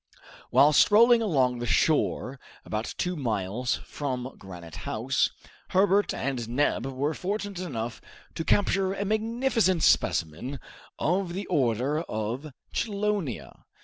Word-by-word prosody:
While 140 +4 +5
strolling 225 +8 +6
along 130 - +1
the 120 - -3
shore 140 -1 +1 0.3
about 110 +1 -4
two 180 0 -1
miles 115 - -1
from 130 -3 -4
Granite 85 -3 -10
House, 115 - 0 0.4
Herbert 200 +2 +3
and 125 -4 -3
Neb 130 0 +1
were 135 +3 -1
fortunate 200 +2 -3
enough 120 -10 -4 0.3
to 165 - -3
capture 195 +1 +2
a 200 - -2
magnificent 220 -3 +1
specimen 85 - +1 0.4
of 180 +1 0
the 195 +2 -4
order 135 - +1
of 120 +2 -4 0.2
chelonia. 200 - -2
145 Hz, 115 wpm, -27 LUFS, 120-195 Hz, 0.4 s, strolling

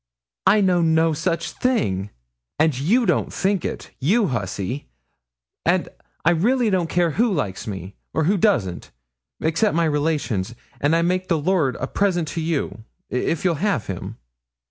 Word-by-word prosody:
'I 210 +1 +6
know 180 -3 +3
no 160 0 +3
such 165 +1 -1
thing; 105 - 0 0.5
and 155 -3 +3
you 200 - +2
don't - - +1
think 195 -2 0
it, - - -5
you 200 - +2
hussy, 110 +2 -3 0.8
and - - +1 0.4
I 170 - +6
really 225 +7 +2
don't 180 -3 +1
care 175 -2 +2
who 230 +7 +2
likes 105 - -2
me 95 -2 -6 0.2
or 160 - 0
who 190 +7 +3
doesn't, 120 - +1 0.5
except 165 +6 +1
my 170 0 +3
relations; 145 -9 -1 0.2
and 145 +3 +2
I 170 - +2
make 185 +2 0
the 170 - +2
lord 155 - +1
a 130 - -3
present 175 0 0
to 165 - -3
you, 140 - -2 0.3
if 155 +7 -1
you'll 170 -4 +1
have 210 -2 +1
him.' 95 -2 -6
165 Hz, 160 wpm, -22 LUFS, 135-185 Hz, 0.8 s, I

